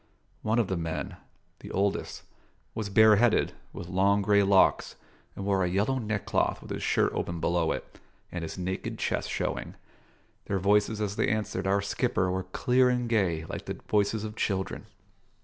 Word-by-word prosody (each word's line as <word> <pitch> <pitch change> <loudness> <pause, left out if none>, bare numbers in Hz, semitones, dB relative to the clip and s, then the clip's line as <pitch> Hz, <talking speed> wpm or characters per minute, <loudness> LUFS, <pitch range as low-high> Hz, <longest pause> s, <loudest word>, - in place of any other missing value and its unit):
One 110 +2 0
of 120 - +3
the 95 - -1
men, 80 -1 -4 0.4
the - - -10
oldest, 100 +1 -1 0.5
was 110 -2 -4
bareheaded, 110 +2 +5 0.2
with 85 - -8
long 100 +2 +2
grey 100 0 +4
locks, 95 -1 +3 0.4
and 100 - -5
wore 100 -2 +2
a 90 - 0
yellow 105 +9 +1
neckcloth 110 -4 -1
with - - -11
his - - -3
shirt - - +2
open 85 -1 -3
below 85 0 +1
it, - - -6 0.3
and 90 - -4
his 80 +2 -6
naked 95 +1 -4
chest - - -2
showing. - - -3 0.7
Their 100 - -1
voices 105 +3 +2
as 105 -1 -2
they - - +2
answered 105 -3 -1
our 100 +1 +2
skipper 100 -3 0
were 95 0 -2
clear 125 +7 +2
and 125 -1 0
gay 90 -8 +1
like - - -6
the - - -3
voices 105 +1 +1
of 110 0 -6
children. 95 -4 -2
100 Hz, 170 wpm, -28 LUFS, 95-110 Hz, 0.7 s, bareheaded